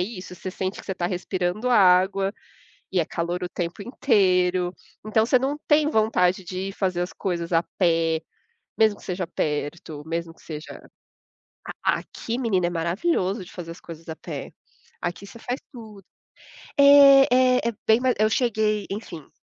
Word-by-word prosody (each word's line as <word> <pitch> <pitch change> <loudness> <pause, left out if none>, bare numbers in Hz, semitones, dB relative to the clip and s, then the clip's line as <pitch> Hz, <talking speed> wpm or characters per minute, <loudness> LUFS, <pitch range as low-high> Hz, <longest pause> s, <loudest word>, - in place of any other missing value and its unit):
isso, 185 -3 -7
você 185 +1 -6
sente 190 +1 -4
que - - -17
você 190 - -3
tá 175 -1 -2
respirando 180 +4 -2
água 195 -1 +4 0.6
e 185 - +1
é 160 - +1
calor 175 +1 -3
o 175 - -3
tempo 175 +3 -4
inteiro. 185 -7 +2 0.3
Então 220 +1 +2
você 250 +1 +3
não 275 +3 -1
tem 300 0 +4
vontade 190 - +2
de 185 +2 -4
ir - - -5
fazer 185 -3 -1
as 180 - -4
coisas 175 -2 -3
a 165 +1 +3
pé, 165 -3 +2 0.6
mesmo 215 -2 +3
que - - -15
seja 180 0 -3
perto, 150 -1 -4
mesmo 165 0 -4
que - - -23
seja 155 -1 -8 1.0
a - - +3
aqui 235 +2 -6
menino, 200 -8 +1
é - - -1
maravilhoso 185 - -1
de 180 - -15
fazer 165 -2 -7
as 170 - -14
coisas 165 -1 -11
a 160 - -5
pé. - - -7 0.5
Aqui 175 +3 -4
você 230 - -12
faz 250 +4 -4
tudo. 215 -6 -12 0.7
É 280 -1 +8
é 255 0 +5
é 235 - -5
bem 220 +2 +5
mais 255 0 +2
eu 215 0 +4
cheguei, 215 -3 0
enfim. 175 -7 -7
185 Hz, 175 wpm, -24 LUFS, 175-220 Hz, 1.0 s, É